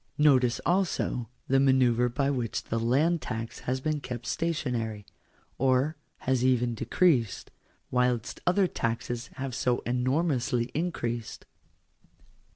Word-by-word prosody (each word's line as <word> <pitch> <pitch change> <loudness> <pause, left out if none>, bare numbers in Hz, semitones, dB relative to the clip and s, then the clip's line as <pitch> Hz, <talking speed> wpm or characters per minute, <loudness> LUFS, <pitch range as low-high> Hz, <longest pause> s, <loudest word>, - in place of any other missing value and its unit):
Notice 130 -5 +4
also 175 - 0 0.2
the 135 +1 +3
manoeuvre 125 -3 +4
by 140 +3 0
which 120 -5 -2
the 115 - -2
land 145 +8 +2
tax 115 -2 -5
has 130 +1 0
been 155 +1 -1
kept 125 -3 -6
stationary, 120 -11 -2 0.5
or 135 +4 +2 0.3
has 130 -1 +1
even 125 -2 +2
decreased, 125 - +1 0.4
whilst 125 -2 0
other 185 +2 +4
taxes 120 -4 -3
have 135 -1 -4
so 125 0 0
enormously 125 -1 0
increased. 120 -9 -3
125 Hz, 115 wpm, -28 LUFS, 120-145 Hz, 0.5 s, Notice